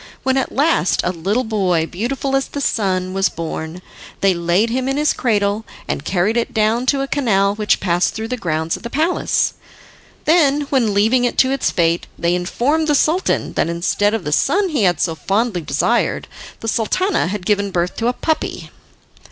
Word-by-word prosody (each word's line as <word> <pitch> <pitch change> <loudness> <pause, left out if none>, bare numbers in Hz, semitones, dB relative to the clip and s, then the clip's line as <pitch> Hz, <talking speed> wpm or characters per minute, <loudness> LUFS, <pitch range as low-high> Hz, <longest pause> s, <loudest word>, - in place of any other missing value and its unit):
When 265 0 +1
at 265 - 0
last 285 - +2
a 175 - 0
little 195 +8 -1
boy, 190 -8 0
beautiful 265 +10 -2
as 270 - 0
the 285 - -6
sun, 185 -8 0
was 195 -2 +2
born, 165 +1 -6 0.4
they 195 -1 +4
laid 175 +6 +1
him 260 +2 -1
in 270 - -1
his 300 0 +2
cradle 205 -2 0 0.2
and - - -3
carried 195 +5 0
it 235 +1 -2
down 220 +3 +1
to 275 0 +2
a 275 - -2
canal 200 -9 +1
which 210 0 +1
passed 175 -1 0
through 225 0 -4
the 250 - -1
grounds 165 -7 -2
of - - -10
the 235 - -6
palace. 320 +7 +1 0.7
Then, 295 -3 +3
leaving 230 -1 +2
it 245 - -1
to 260 - +4
its 275 -1 0
fate, 170 -1 0
they 170 +1 +1
informed 250 - 0
the 295 - +3
Sultan 325 +6 +1
that - - 0
instead 195 +5 0
of 220 - -4
the 150 - -3
son 385 - +2
he 275 - +1
had 175 -4 +2
so 165 - 0
fondly 200 +3 -1
desired 155 - 0 0.3
the 225 - -5
Sultana 245 - 0
had 195 0 -4
given 200 0 +1
birth 175 -1 -1
to 230 - 0
a 245 - +2
puppy. 315 +4 -3
215 Hz, 190 wpm, -19 LUFS, 180-265 Hz, 0.7 s, they